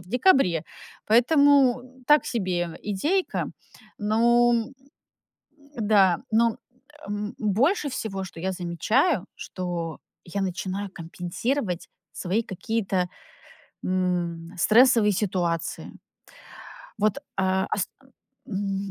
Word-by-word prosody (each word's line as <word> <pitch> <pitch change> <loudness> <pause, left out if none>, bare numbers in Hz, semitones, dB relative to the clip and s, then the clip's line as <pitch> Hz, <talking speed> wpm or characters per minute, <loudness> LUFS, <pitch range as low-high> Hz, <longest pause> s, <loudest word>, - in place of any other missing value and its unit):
в 175 - -16
декабре. 240 - +3 0.4
Поэтому 260 +1 +5 0.2
так 295 +1 +5
себе 180 -7 -2
идейка. 300 - 0 0.5
Ну, 235 +3 +3
м, - - +4
м, 265 +5 -11 1.0
да. 200 -5 +4
Ну, 225 +2 +4
м, 225 - -7 0.5
эм, 205 +1 -4
но 215 - -2
больше 275 - +2
всего, 195 -7 -4
что 170 - -11
я 190 +3 -1
замечаю, 185 - +1
что 175 -3 -5 0.3
я 185 +3 -3
начинаю 190 +1 -3
компенсировать 180 - -3 0.2
свои 190 +5 -1
какие-то, 195 -2 -1 0.8
м, 175 -2 -1
стрессовые 225 +2 +5
ситуации. 175 -4 -2 1.1
Вот, 215 +6 +1
э, - - -21 0.5
ас 190 - -1 0.6
м, 195 -1 -3
200 Hz, 100 wpm, -25 LUFS, 180-235 Hz, 1.1 s, Поэтому